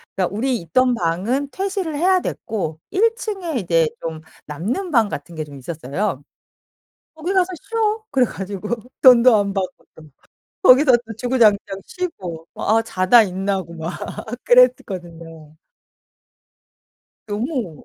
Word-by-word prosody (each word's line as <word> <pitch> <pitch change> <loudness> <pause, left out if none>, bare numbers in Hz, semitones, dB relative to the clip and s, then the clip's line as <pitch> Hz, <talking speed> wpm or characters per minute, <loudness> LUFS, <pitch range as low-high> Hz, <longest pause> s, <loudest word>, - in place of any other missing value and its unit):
그러니까 190 +1 -1
우리 250 +3 0
있던 250 +10 +2
방은 215 +10 -1
퇴실을 380 -5 -3
해야 365 +5 +3
됐고 180 - -4
1 455 +4 +2
층에 385 - -4
이제 165 -4 +2 0.2
좀 160 -1 -4 0.3
남는 215 - -3
방 230 -6 +4
같은 170 -2 -7
게 155 -1 -4
좀 145 -2 -12
있었어요. 150 +4 -4 0.9
"거기 320 +4 -3
가서 370 -2 +3
쉬어." 440 -1 -1
그래 260 -2 +3
가지고 200 -1 -6 0.3
돈도 250 -2 +7
안 200 -1 +1
받고 190 -2 -4
또 160 - -14 0.6
거기서 270 -4 +6 0.2
또 225 - -7
주구장창 215 -5 +2
쉬고 180 - -6
막 - - -3
아 - - +1
자다 225 +2 +4
일어나고 190 -3 -3
막 165 +1 -5 0.5
그랬었거든요. 170 -11 +1 1.7
너무 215 - -4
210 Hz, 260 characters per minute, -20 LUFS, 170-270 Hz, 1.7 s, 돈도